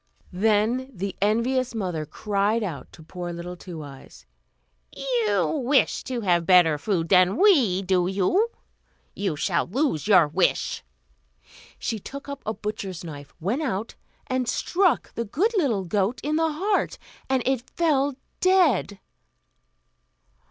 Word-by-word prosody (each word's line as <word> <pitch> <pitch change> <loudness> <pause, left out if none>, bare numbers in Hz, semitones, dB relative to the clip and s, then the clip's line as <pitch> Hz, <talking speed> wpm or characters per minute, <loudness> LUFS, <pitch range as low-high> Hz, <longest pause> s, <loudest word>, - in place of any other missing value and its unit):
Then 220 +6 +1
the 195 -3 -5
envious 235 +4 +1
mother 180 -8 -3
cried 210 +5 0
out 165 -9 -6
to 160 - -13
poor 175 +2 -6
little 170 +1 -6
Two 170 -3 -8
Eyes, 135 - -13 0.7
"You 210 - 0
wish 270 +2 +2
to 250 -2 -3
have 175 -4 +2
better 175 -5 +5
food 170 -2 -1
than 185 +1 +5
we, 255 - +4
do 185 -1 +2
you? 200 - +1 0.7
You 195 -6 -1
shall 170 +3 0
lose 245 - -1
your 180 -7 +6
wish!" 150 - 0 0.9
She 220 - -3
took 280 +8 -9
up 280 0 -6
a 220 - 0
butcher's 200 -4 -5
knife, 145 -4 -9
went 205 - -1
out, 225 -7 -3 0.3
and 255 -2 -1
stuck 360 -6 +1
the 235 - -2
good 355 - +1
little 240 - +1
goat 205 +6 0
in 300 +1 0
the 325 0 +2
heart, 390 +7 0 0.3
and 260 -2 +1
it 265 -2 +1
fell 285 -5 +1 0.2
dead. 330 - +3
210 Hz, 140 wpm, -25 LUFS, 180-265 Hz, 0.9 s, your